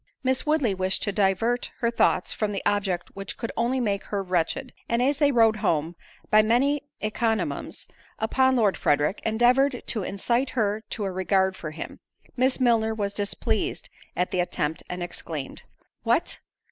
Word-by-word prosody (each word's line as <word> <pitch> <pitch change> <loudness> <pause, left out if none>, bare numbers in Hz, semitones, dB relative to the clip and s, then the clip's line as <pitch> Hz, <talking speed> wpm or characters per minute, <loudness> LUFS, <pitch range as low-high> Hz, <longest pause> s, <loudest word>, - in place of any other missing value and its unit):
Miss 260 +2 0
Woodley 295 -9 +2
wished 190 0 -1
to 205 - 0
divert 205 +5 +1
her 235 -3 0
thoughts 185 -5 +2
from 215 -1 -1
the 200 - -4
object 195 -4 0
which 195 -1 -6
could 230 - -4
only 240 +3 +1
make 200 -5 -1
her 200 -1 -2
wretched, 185 +8 -1 0.2
and 235 - +1
as 270 +3 +2
they 290 -1 +4
rode 225 -3 +4
home, 165 -3 0 0.4
by 215 - +7
many 260 +7 +2 0.2
encomiums 225 +1 -2 0.3
upon 260 +4 +2
Lord 215 -5 +2
Frederick, 145 +6 +1
endeavoured 245 +4 +3
to 220 - -2
incite 235 +7 0
her 215 -1 +1
to 215 - -4
a 195 - -2
regard 190 +1 +1
for 155 - -6
him; 155 - -8 0.4
Miss 260 +2 +1
Milner 225 -3 +3
was 200 -2 -2
displeased 205 0 -2 0.2
at 180 - 0
the 180 - 0
attempt, 160 -3 -1
and 180 0 -4
exclaimed, 160 -5 -5 0.4
"What! - - 0
215 Hz, 165 wpm, -26 LUFS, 190-245 Hz, 0.4 s, by